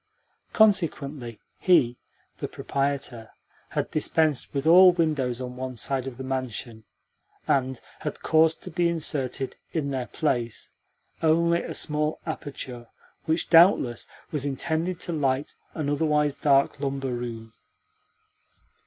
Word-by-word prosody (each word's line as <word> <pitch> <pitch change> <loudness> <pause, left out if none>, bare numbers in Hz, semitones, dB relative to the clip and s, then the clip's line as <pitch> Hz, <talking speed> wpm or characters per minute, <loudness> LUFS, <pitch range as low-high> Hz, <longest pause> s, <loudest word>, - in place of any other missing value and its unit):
Consequently 150 - +1 0.2
he 150 -10 +4 0.4
(the - - -3
proprietor) 135 -5 -3 0.4
had - - -2
dispensed 155 -2 +1
with 140 0 -3
all 180 +3 +8
windows 150 -8 0
on 125 -1 -6
one 130 0 -5
side 130 +3 -2
of 125 -2 -7
the 130 - -6
mansion, 125 -4 -4 0.6
and 130 -2 +1 0.2
had - - -5
caused 160 0 +3
to - - -7
be 170 +1 +1
inserted, 140 -5 -2 0.2
in 145 -4 -1
their 130 -3 -3
place, 120 -6 -2 0.5
only 170 +1 +3
a - - -5
small 150 0 +1
aperture 125 -5 -6 0.4
which, 160 +1 -1
doubtless, 165 - +5 0.2
was 150 -3 -1
intended 160 +5 -2
to 175 - -3
light 140 -2 0 0.2
an 155 -3 -2
otherwise 150 0 +1
dark 140 -1 +2
lumber 135 -2 -2
room. 115 -2 -6
140 Hz, 125 wpm, -26 LUFS, 130-160 Hz, 0.6 s, all